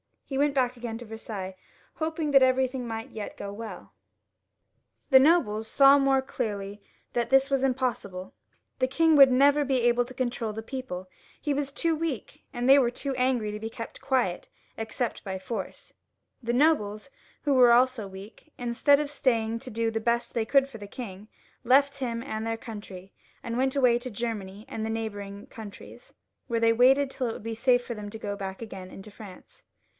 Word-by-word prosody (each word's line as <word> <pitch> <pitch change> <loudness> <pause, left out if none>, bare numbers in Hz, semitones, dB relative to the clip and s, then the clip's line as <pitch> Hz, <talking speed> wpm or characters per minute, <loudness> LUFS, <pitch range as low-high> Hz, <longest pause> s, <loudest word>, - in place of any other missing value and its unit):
He 270 - -4
went 285 0 +2
back 250 -2 +1
again 235 -2 -5
to 240 - -9
Versailles, 215 -4 -7 0.4
hoping 315 -1 -2
that 275 -1 +7
everything 260 -1 +2
might 225 0 -5
yet 215 -2 -7
go 200 - -6
well 225 +1 -9 1.2
The 265 - +9
nobles 260 -8 +3
saw 275 +3 +6
more 270 -1 +3
clearly 205 -5 -4 0.3
that 235 -1 0
this 270 +1 +4
was 270 -1 +2
impossible. 245 -8 -2 0.5
The 255 - +2
king 320 +4 +3
would 275 -1 +9
never 285 +3 +4
be 265 -2 +1
able 240 0 +3
to 255 - -11
control 240 -3 -2
the 220 +1 -6
people; 230 -8 -6 0.3
he 295 - -1
was 280 -1 -2
too 330 +3 0
weak, 310 -7 -4
and 245 +1 -2
they 275 +1 +8
were 245 -3 +3
too 270 +3 -4
angry 250 -4 +1
to 210 - -5
be 220 +1 -5
kept 230 0 -8
quiet, 245 -10 0 0.3
except 225 +2 -3
by 190 -1 -3
force. 190 +1 -6 0.5
The 235 -1 -2
nobles, 245 -5 +2 0.3
who 290 - +2
were 250 -2 +7
also 250 -3 +3
weak, 195 +10 -12
instead 245 +4 +3
of 295 -1 -4
staying 230 -5 0
to 255 - -9
do 230 0 -1
the 225 - -1
best 235 +1 0
they 230 -2 0
could 275 +3 +4
for 240 - -9
the 205 - -8
king, 205 -3 -8 0.4
left 280 +3 +4
him 235 -3 -3
and 220 -4 -4
their 225 0 -1
country, 205 -5 -9 0.3
and 230 0 -3
went 265 +1 +1
away 250 -3 +4
to 255 +1 -6
Germany 210 -3 -5
and 225 -5 -4
the - - -3
neighbouring 205 -3 -5
countries, 215 -3 -11 0.3
where 230 -2 -1
they 230 0 +5
waited 265 +4 +4
till 255 -2 -2
it 225 - -2
should - - -9
be 225 0 -4
safe 245 +1 +2
for 240 - -4
them 210 -2 -7
to 220 - -7
go 205 -2 -4
back 195 0 -6
again 190 -4 -8
into 195 +3 -11
France. 200 - -13
235 Hz, 190 wpm, -27 LUFS, 215-265 Hz, 1.2 s, The